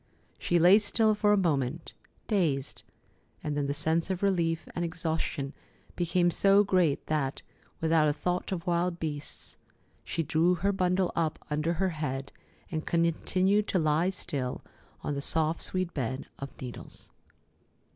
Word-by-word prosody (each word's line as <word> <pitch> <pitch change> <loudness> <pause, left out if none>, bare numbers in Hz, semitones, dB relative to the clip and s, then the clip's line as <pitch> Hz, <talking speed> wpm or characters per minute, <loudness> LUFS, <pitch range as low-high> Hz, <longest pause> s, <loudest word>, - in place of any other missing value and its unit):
She 175 - +1
lay 180 +5 +7
still 215 +1 +2
for 210 0 +2
a 210 - +5
moment, 155 -4 0 0.3
dazed, 155 - 0 0.6
and 150 -1 -2
then 145 -1 0
the 140 - 0
sense 160 +4 0
of 190 0 -2
relief 170 -4 +1
and 175 - -2
exhaustion 160 -4 -2 0.4
became 175 0 +2
so 200 +3 +5
great 185 -7 +2
that, 145 -3 -1 0.4
without 160 -1 +4
a 145 - +2
thought 180 +5 -2
of 175 -2 -3
wild 175 0 +1
beasts, 145 -2 -5 0.5
she 165 - -2
drew 165 +4 +3
her 195 +4 +1
bundle 185 -1 +1
up 160 -2 0
under 155 +3 +1
her 190 +3 0
head 140 -5 -4 0.4
and 155 -2 -3
continued 185 +5 +2
to - - +1
lie 160 +2 +2
still 140 -9 -4 0.4
on - - -1
the 140 - -3
soft, 160 +2 +1
sweet 185 -2 -1
bed 130 -1 -3
of 140 - -5
needles. 125 -2 -7
165 Hz, 150 wpm, -29 LUFS, 150-185 Hz, 0.6 s, lay